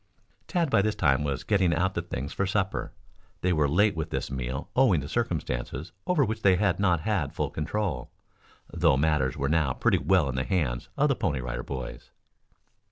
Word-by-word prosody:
Tad 170 -6 0
by - - +5
this 105 +1 0
time 70 -4 +2
was 70 -3 -2
getting 95 -5 +2
out 95 +4 +1
the 85 - -1
things 70 -5 -5
for 100 - -1
supper. 95 0 -1 0.5
They 90 0 +2
were 75 -3 +2
late 100 +5 +3
with 80 0 -3
this - - -3
meal 65 +1 -4
owing 125 - +4
to 70 - -6
circumstances 80 - -3 0.2
over 165 -7 +3
which 110 0 -3
they 95 -3 +5
had 100 -1 +1
not 90 -5 +2
had 85 -7 -1
full - - -1
control, 80 -4 -2 0.6
though 65 - +3
matters 75 -3 +1
were 70 - 0
now 75 -3 +2
pretty - - +2
well 95 -6 +3
in 65 - -2
the 65 0 -1
hands 75 -10 -1
of 150 - +4
the 135 - +2
Pony 85 - -1
Rider 60 0 -4
Boys. 65 -2 -7
85 Hz, 195 wpm, -27 LUFS, 70-100 Hz, 0.6 s, by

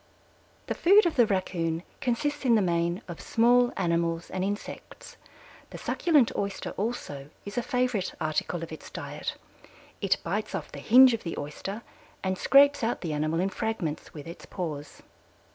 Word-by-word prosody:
The - - -2
food 400 +4 +5
of 340 - +1
the 240 -3 +5
Raccoon 175 -4 -1 0.2
consists 285 +3 -1
in 240 -3 +4
the 215 - +4
main 170 +2 0
of 170 -2 -7
small 245 +1 +4
animals 170 -2 0
and 185 0 -2
insects. 205 +2 -6 0.5
The - - -8
succulent 300 -9 +2
Oyster 200 -1 -3
also 190 - -4 0.2
is 205 0 -7
a 245 - +1
favorite 245 -5 0
article 155 +2 -1
of 165 - -7
its 160 - -9
diet. - - -5 0.7
It 195 -3 +2
bites 210 +5 -2
off - - -5
the - - -8
hinge 255 +2 +7
of 230 - -2
the 165 - -5
Oyster 195 +9 -5 0.4
and 190 0 0
scrapes 280 +5 +5
out 230 +2 0
the 165 -4 -3
animal 155 +2 0
in 190 +2 +1
fragments 190 -8 -3
with 150 -2 -9
its 170 - -10
paws. 150 -5 -6
195 Hz, 165 wpm, -28 LUFS, 165-240 Hz, 0.7 s, hinge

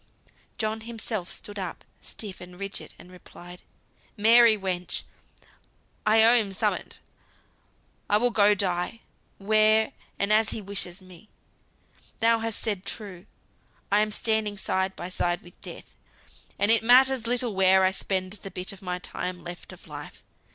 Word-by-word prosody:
John 220 0 -2
himself 225 -4 -5
stood 205 -1 -7
up, 185 -3 -6 0.2
stiff 200 -4 -7
and 180 +1 -12
rigid, 195 0 -5
and 180 - -15
replied, 180 0 -13 0.6
"Mary, 225 +1 +6
wench! 180 -3 -3 1.0
I 220 +1 +6
owe 230 +2 +8
him 220 -5 +4
summut. - - -1 1.1
I 205 - +5
will 245 +3 +2
go 205 -2 +4
die, 185 +2 -2 0.4
where, 215 +2 +3 0.2
and 200 +1 +1
as 215 0 +3
he - - -4
wishes 195 -2 -3
me. 185 +2 -16 0.9
Thou 230 0 +3
hast 225 -1 -2
said 205 -4 -2
true, 200 -2 -6 0.6
I 205 - +4
am 215 0 +1
standing 215 -1 -1
side 190 0 -1
by 175 - -7
side 175 -1 -1
with 175 - -17
Death; - - -11 0.6
and 205 +2 +3
it 225 - +4
matters 250 +1 +5
little 245 -2 0
where 190 0 +5
I 185 - +3
spend 190 0 -2
the 200 -1 -9
bit 185 +2 -5
of 195 - -12 0.2
time 180 -1 -5
left 175 0 -9
of - - -14
Life. - - -10
205 Hz, 150 wpm, -26 LUFS, 185-220 Hz, 1.1 s, owe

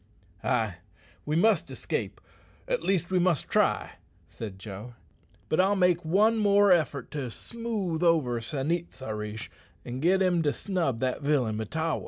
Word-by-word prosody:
"Ay, 105 -5 0 0.5
we 150 - 0
must 215 +7 +3
escape - - -4 0.5
at - - 0
least 185 -2 0
we 185 - +3
must 175 -5 +1
try," - - +1 0.4
said 105 -4 -8
Joe. 105 +4 -9 0.5
"But 155 - 0
I'll 195 +2 +4
make 180 -2 +3
one 210 +8 +3
more 205 -1 +5
effort 150 -7 +1
to 140 -4 -3
smooth 210 - -3
over 150 -9 +2
San 135 +5 -2
it 170 0 -2
sa 130 -4 -6
rish, 105 +1 -5 0.3
an' 125 +1 -5
git 180 +6 +3
him 180 -3 +2
to 145 -2 +1
snub 165 - -1
that 130 +2 -1
villain 140 -7 +1
Mahtawa." 160 +9 -2
160 Hz, 160 wpm, -28 LUFS, 125-185 Hz, 0.5 s, more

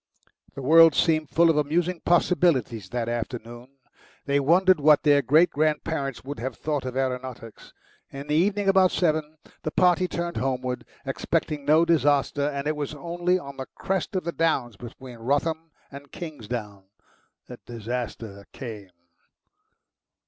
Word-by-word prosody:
The 135 - -7
world 165 +2 +7
seemed 155 -3 +1
full 165 0 +4
of 155 - -1
amusing 165 +4 0
possibilities 155 - +1
that 120 0 -3
afternoon. 120 +2 -6 0.5
They 140 0 +1
wondered 180 +5 +4
what 150 0 +5
their 145 -1 +5
great 155 +6 +4
grandparents 150 -3 -1
would 140 -2 -7
have 130 +3 -5
thought 150 -4 -3
of 130 0 -4
aeronautics. 125 -3 -5 0.4
In 140 +1 -8
the 150 - -3
evening, 195 +5 +1
about 190 -1 +5
seven, 155 -3 -1 0.2
the - - -3
party 180 +2 +3
turned 170 -1 -4
homeward, 130 -1 -2 0.2
expecting 145 -2 -2
no 155 +3 +4
disaster, 145 -3 +2
and 140 -1 -4
it 155 +1 0
was 150 0 -4
only 175 +3 -1
on 140 -5 -9
the 130 - -6
crest 190 0 -3
of 185 - -1
the 170 - -3
downs 145 -9 0
between 120 +2 -11
Wrotham 160 +6 -1 0.2
and 140 0 -11
Kingsdown 115 - -7 0.6
that 125 - -12
disaster 115 -3 -6
came. 110 -7 -8
145 Hz, 145 wpm, -25 LUFS, 125-165 Hz, 0.6 s, world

